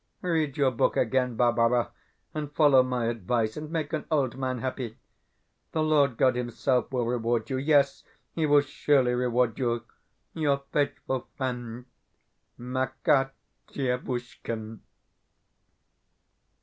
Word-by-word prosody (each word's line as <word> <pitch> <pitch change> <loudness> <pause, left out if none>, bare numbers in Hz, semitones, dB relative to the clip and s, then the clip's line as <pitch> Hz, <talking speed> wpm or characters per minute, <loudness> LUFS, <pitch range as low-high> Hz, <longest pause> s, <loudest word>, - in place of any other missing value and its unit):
Read 160 -6 0
your 140 -3 +3
book 115 - +1
again, 125 0 +1
Barbara, 120 0 +2 0.4
and 150 -2 -4
follow 145 -4 +6
my 125 -2 -1
advice, 115 0 -1
and 150 0 -6
make 160 -2 -3
an 155 - -2
old 140 -6 +1
man 130 -1 -2
happy. 125 -2 -4 0.8
The 155 - +1
Lord 145 -5 +3
God 130 -2 +4
Himself 125 +1 0
will 125 -2 0
reward 115 -1 0
you. 130 - 0
Yes, 140 -1 +3 0.3
He 160 -2 0
will 145 0 +6
surely 140 -3 +2
reward 125 -1 +1
you. 120 -2 0 0.5
Your 145 -4 0
faithful 140 -3 -1
friend, 125 -2 -4 0.7
MAKAR 130 +2 0 0.4
DIEVUSHKIN. 120 -4 -4
130 Hz, 120 wpm, -27 LUFS, 120-140 Hz, 0.8 s, follow